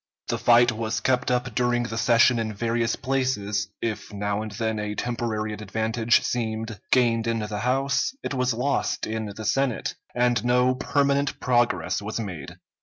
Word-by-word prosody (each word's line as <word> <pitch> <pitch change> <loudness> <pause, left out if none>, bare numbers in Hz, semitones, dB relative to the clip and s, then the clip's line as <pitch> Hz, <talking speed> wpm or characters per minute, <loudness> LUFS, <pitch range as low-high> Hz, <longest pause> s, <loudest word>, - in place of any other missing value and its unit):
The - - -1
fight 120 0 +5
was 110 0 -2
kept 130 0 +1
up 125 -1 0
during 120 +1 +1
the 115 -1 -4
session 120 0 +4
in 110 -2 -3
various 115 +2 0
places; 105 -7 -1 0.2
if 110 -2 -3
now 100 0 -2
and 110 - -5
then 110 0 -2
a 105 0 -3
temporary 110 -3 -2
advantage 110 +2 +1
seemed 110 -3 -3
gained 115 -3 +3
in 115 0 +1
the 105 -1 -3
House, 135 +4 +1
it - - -3
was 125 -1 +1
lost 140 +4 0
in 110 0 -3
the 110 - -7
Senate, 135 +1 0 0.2
and 120 -2 +2
no 125 +1 +3
permanent 140 +1 0
progress 110 -9 +1
was 105 +2 -4
made. 90 -10 -6
115 Hz, 165 wpm, -25 LUFS, 110-125 Hz, 0.2 s, fight